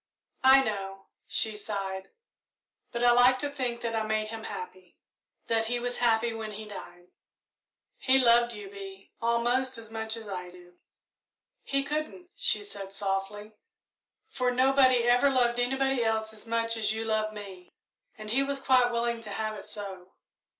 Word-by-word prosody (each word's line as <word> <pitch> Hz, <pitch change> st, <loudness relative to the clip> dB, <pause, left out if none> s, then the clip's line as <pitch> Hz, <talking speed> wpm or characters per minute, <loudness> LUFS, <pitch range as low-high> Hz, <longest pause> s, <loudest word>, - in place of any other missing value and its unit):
"I 265 Hz, +1 st, +8 dB
know," 195 Hz, -3 st, -5 dB, 0.2 s
she 220 Hz, -1 st, +1 dB
sighed; 195 Hz, -2 st, -4 dB, 0.8 s
"but 235 Hz, 0 st, -2 dB
I 240 Hz, -, +7 dB
like 245 Hz, +1 st, +6 dB
to 285 Hz, +2 st, -3 dB
think 250 Hz, -4 st, -3 dB
that 230 Hz, -1 st, -2 dB
I 220 Hz, -, +1 dB
made 215 Hz, 0 st, -1 dB
him 225 Hz, 0 st, -7 dB
happy 455 Hz, 0 st, -8 dB, 0.5 s
that 225 Hz, -1 st, +1 dB
he 240 Hz, +2 st, -1 dB
was 245 Hz, 0 st, -3 dB
happy 230 Hz, -1 st, +2 dB
when 220 Hz, -1 st, -5 dB
he 215 Hz, +1 st, -7 dB
died." 175 Hz, -4 st, -10 dB, 0.9 s
"He 265 Hz, 0 st, +4 dB
loved 240 Hz, -1 st, +5 dB
you, 210 Hz, -3 st, -8 dB
Bee 195 Hz, -1 st, -10 dB
almost 240 Hz, +2 st, +1 dB
as 225 Hz, -1 st, -11 dB
much 220 Hz, 0 st, -4 dB
as 225 Hz, -2 st, -9 dB
I 180 Hz, -2 st, -5 dB
do." 175 Hz, 0 st, -16 dB, 0.9 s
"He 275 Hz, 0 st, -1 dB
couldn't," 310 Hz, +5 st, -4 dB
she -, -, +2 dB
said 195 Hz, -, -8 dB
softly, 195 Hz, +1 st, -3 dB, 0.8 s
"for 250 Hz, -1 st, -1 dB
nobody 255 Hz, -1 st, +4 dB
ever 245 Hz, +3 st, +4 dB
loved 245 Hz, -2 st, +2 dB
anybody 265 Hz, 0 st, +1 dB
else 220 Hz, -1 st, 0 dB
as 220 Hz, +1 st, -11 dB
much 230 Hz, 0 st, 0 dB
as 215 Hz, -1 st, +1 dB
you 220 Hz, +1 st, -3 dB
love 215 Hz, -1 st, 0 dB
me"; 195 Hz, -4 st, -10 dB, 0.5 s
and 215 Hz, 0 st, -7 dB
he 265 Hz, +4 st, +3 dB
was 275 Hz, 0 st, -1 dB
quite 255 Hz, -2 st, +4 dB
willing 235 Hz, 0 st, -1 dB
to 215 Hz, -, -9 dB
have 215 Hz, +1 st, -3 dB
it 200 Hz, -, -9 dB
so. 190 Hz, -3 st, -8 dB
225 Hz, 165 wpm, -29 LUFS, 210-245 Hz, 0.9 s, I